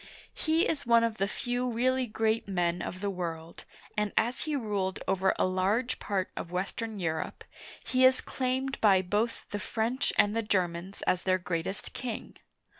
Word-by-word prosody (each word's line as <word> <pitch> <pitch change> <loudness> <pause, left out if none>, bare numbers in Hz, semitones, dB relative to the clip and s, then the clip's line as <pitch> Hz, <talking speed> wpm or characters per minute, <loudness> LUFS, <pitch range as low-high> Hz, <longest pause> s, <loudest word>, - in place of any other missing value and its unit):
He 320 +2 +2
is 310 - -1
one 235 -1 +6
of 230 -1 -1
the 195 - +2
few 245 +3 -2
really 255 +2 +1
great 220 0 0
men 175 -2 0
of 185 - -5
the 200 - 0
world, 170 -3 -5 0.3
and 210 -1 0
as 240 +6 +1
he 305 -1 -1
ruled 205 -7 -1
over 190 0 +2
a - - +3
large 195 +7 +1
part 195 -3 -1
of 170 - -5
western 200 +4 -3
Europe, 160 -3 -2 0.4
he 255 0 +2
is 260 0 +7
claimed 265 +1 -2
by 195 -3 +5
both 210 +5 -1
the 205 - -2
French 235 +5 -1
and 205 +1 +4
the 230 - +2
Germans 185 -2 -1
as 180 - +2
their 185 0 +2
greatest 180 +2 -3
king. 240 -4 -5
210 Hz, 175 wpm, -30 LUFS, 185-245 Hz, 0.4 s, is